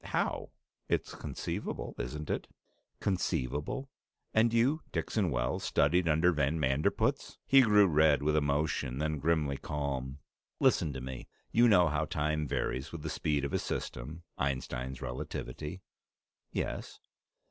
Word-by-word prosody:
"How? - - -1 0.4
It's - - 0
conceivable, - - -4
isn't 75 +6 -4
it?" - - -2 0.5
"Conceivable? 75 - -1 0.5
And 110 +1 +4
you, 125 +7 +3
Dixon 100 -5 0
Wells, - - -1
studied 85 +5 +3
under 80 +4 +4
van 75 0 +1
Manderpootz!" 70 +1 +1
He 135 0 +7
grew 105 -4 +6
red 75 -4 +4
with 75 +1 +2
emotion, 70 -3 0
then 75 0 -1
grimly 75 -2 +1
calm. 70 -3 -3 0.4
"Listen 80 - +3
to 65 - -5
me. 65 -1 -6 0.2
You 120 +1 +6
know 90 -6 +6
how 75 0 0
time 75 0 -1
varies 65 +1 -2
with 85 -3 -7
the 80 - -3
speed 70 -1 0
of 70 - -4
a - - +2
system 75 +8 -5 0.2
Einstein's 65 -1 -2
relativity." 75 +7 -5 0.7
"Yes." - - -4
75 Hz, 135 wpm, -31 LUFS, 70-85 Hz, 0.7 s, He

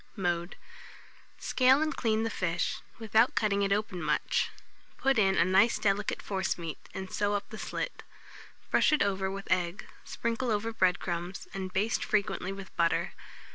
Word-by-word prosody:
Mode. 175 -2 -1 0.8
Scale 260 +1 +4
and 310 0 -1
clean 220 -2 +1
the 225 - -1
fish, 170 -3 -1 0.2
without 225 +1 +3
cutting 205 -1 +2
it 195 0 +1
open 200 -3 0
much; - - +1 0.5
put 270 -3 +2
in 195 -2 +4
a - - +5
nice 190 +6 +4
delicate 200 0 0
forcemeat, 175 -4 -2 0.2
and 190 -1 -6
sew 205 -1 +1
up 200 0 -3
the 220 - -7
slit. - - -4 0.7
Brush - - +4
it 305 - +4
over 190 -1 0
with 195 +1 -6
egg, 180 +1 0 0.2
sprinkle 235 +2 -2
over 225 +1 0
bread 185 -3 +3
crumbs, 175 +1 -4
and 190 -1 -4
baste 210 +5 0
frequently 195 -3 0
with 195 -1 -9
butter. 170 -1 +1
195 Hz, 160 wpm, -30 LUFS, 185-220 Hz, 0.8 s, a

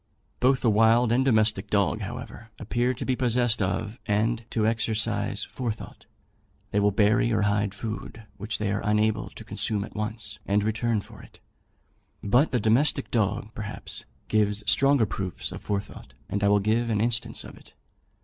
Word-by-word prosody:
Both 130 +1 +3
the 120 - +3
wild 115 +2 +4
and 125 +3 +3
domestic 110 -5 +2
dog, 100 -3 +1
however, 115 - -7
appear 120 +3 0
to - - -5
be 130 - +1
possessed 120 -2 +2
of 105 +4 -2
and 110 +2 +1
to 110 -2 0
exercise 110 -2 0
forethought. 115 -4 -6 0.6
They 105 - +2
will 105 0 +4
bury 105 +3 +3
or 105 -2 +2
hide 100 -1 0
food, 110 +1 -6
which 105 +1 -2
they 105 -2 -1
are 100 - -1
unable 105 +1 +1
to - - -11
consume 105 -2 -1
at - - -10
once, 110 +1 -4
and 100 +1 +2
return 110 0 0
for - - -13
it. - - -17 0.8
But 125 +9 +3
the 125 - +1
domestic 130 +6 +2
dog, 110 0 0
perhaps, 105 -1 -6 0.2
gives 105 -1 +1
stronger 135 +2 +4
proofs 95 -4 -4
of - - -7
forethought; 100 -1 -5
and 100 0 -2
I - - +4
will 100 0 +4
give 110 +4 +1
an 110 -2 +1
instance 115 0 0
of - - -11
it. - - -18
110 Hz, 170 wpm, -26 LUFS, 105-115 Hz, 0.8 s, wild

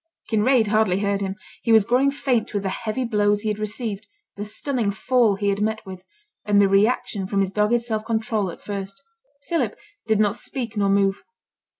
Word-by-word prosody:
Kinraid 225 +2 +3
hardly 210 -3 +2
heard 200 -1 0
him. 195 -1 -2 0.3
He 230 - 0
was 220 -3 +6
growing 255 +5 +3
faint 265 -6 -1
with 200 - 0
the 195 - -1
heavy 230 +5 -3
blows 205 -2 +2
he 215 - -2
had 210 0 -2
received, 215 -1 -4 0.3
the 205 - -5
stunning 225 +1 -2
fall 230 0 +2
he 200 +1 0
had 200 +1 -1
met 220 +1 -1
with, 185 -1 -9 0.4
and 205 -1 +3
the 200 - +5
reaction 200 -1 +1
from 200 0 -1
his 195 -1 +1
dogged 210 +4 +2
self 220 -2 -2
control 220 -3 -1
at 170 - -10
first. 195 0 -6 0.5
Philip 270 - -1 0.3
did 220 -2 +2
not 210 -1 +2
speak 240 -3 -5
nor 200 -1 +1
move. 195 0 +2
210 Hz, 195 wpm, -23 LUFS, 200-230 Hz, 0.5 s, was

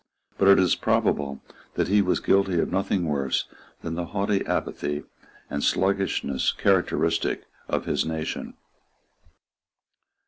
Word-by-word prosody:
But 100 - +4
it 100 - +8
is 90 -2 +4
probable 70 -2 0 0.3
that - - +1
he 100 +2 +4
was 90 -2 +1
guilty 95 -3 +2
of - - 0
nothing 95 -1 0
worse 70 -4 0 0.4
than 80 - -3
the 85 +1 -3
haughty 100 0 0
apathy 75 0 -2 0.4
and 70 - -3
sluggishness 95 -8 +1
characteristic 90 -3 +1 0.2
of - - -1
his - - +1
nation. 80 -1 -4
90 Hz, 125 wpm, -25 LUFS, 75-100 Hz, 0.4 s, it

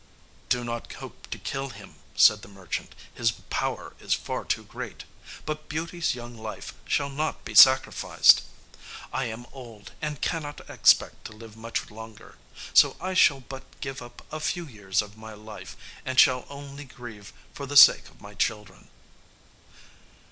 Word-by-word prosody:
"Do 125 -1 +1
not 120 -1 -5
hope - - -11
to - - -5
kill 135 0 -4
him," 100 -4 -12 0.2
said 105 -1 +6
the - - -12
merchant; 95 -4 -6 0.2
"his 115 -2 +1 0.2
power - - -2
is - - 0
far - - -5
too - - -1
great. - - -8 0.4
But 155 0 -5
Beauty's 165 0 -2
young 120 -1 -9
life 110 -1 -8
shall 140 -1 0
not 155 +3 -3
be 110 - -7
sacrificed; 130 +5 +6 0.7
I 130 - -1
am 115 +1 -6
old, 115 -6 -12
and 150 -2 -4
cannot 150 -3 -4
expect - - +3
to 110 - -8
live 110 0 -13
much 115 -1 -5
longer; 110 0 -12 0.3
so - - +6
I 185 +2 -3
shall 140 -7 +4
but 135 +1 -12
give 135 -2 -6
up 120 0 -13
a 155 - -3
few 170 +2 -2
years 105 -6 -2
of 105 +1 -14
my 110 -1 -10
life, 105 -3 -11 0.3
and 130 0 0
shall 125 -1 +5
only 140 0 -9
grieve 115 -5 -11 0.2
for 140 - -7
the 145 +2 +1
sake - - +9
of - - -23
my 100 0 -11
children." 105 -1 -3
120 Hz, 160 wpm, -26 LUFS, 110-140 Hz, 0.7 s, sake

